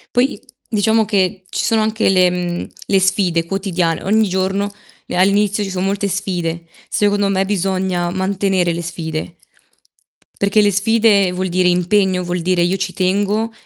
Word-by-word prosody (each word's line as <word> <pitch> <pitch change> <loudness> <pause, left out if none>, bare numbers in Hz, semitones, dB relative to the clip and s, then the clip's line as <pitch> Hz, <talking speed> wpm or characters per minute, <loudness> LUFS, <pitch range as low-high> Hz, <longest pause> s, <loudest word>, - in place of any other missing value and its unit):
Poi, 250 -2 +2 0.3
diciamo 220 +1 +2
che 190 -2 0
ci - - -2
sono 225 -2 +2
anche 220 0 +1
le 185 -1 +4
mhmm, 175 -1 -3 0.2
le 195 -1 +3
sfide 185 -3 +1
quotidian 180 -3 -1
Ogni 215 +2 +2
giorno, 190 +2 -1 0.4
ehm, - - -4
all'inizio 205 +2 +2
ci 195 - -4
so 190 -1 -4
molte 200 +1 -1
sfide. 175 -3 -3 0.2
Secondo 205 -1 +1
me, 195 0 +1
bisogna 190 -2 -1
mantenere 190 -2 0
le 170 - -4
sfide 165 -1 -5 1.1
perché 200 +2 +3
le 205 - +3
sfide 205 -2 +3
vuol 185 0 -3
dire 180 +1 +2
impegno, 180 +1 +2
vuol 175 0 -2
dire 180 0 +1
io 175 +2 +1
ci 185 0 -3
tengo 205 +4 0
190 Hz, 160 wpm, -18 LUFS, 180-205 Hz, 1.1 s, le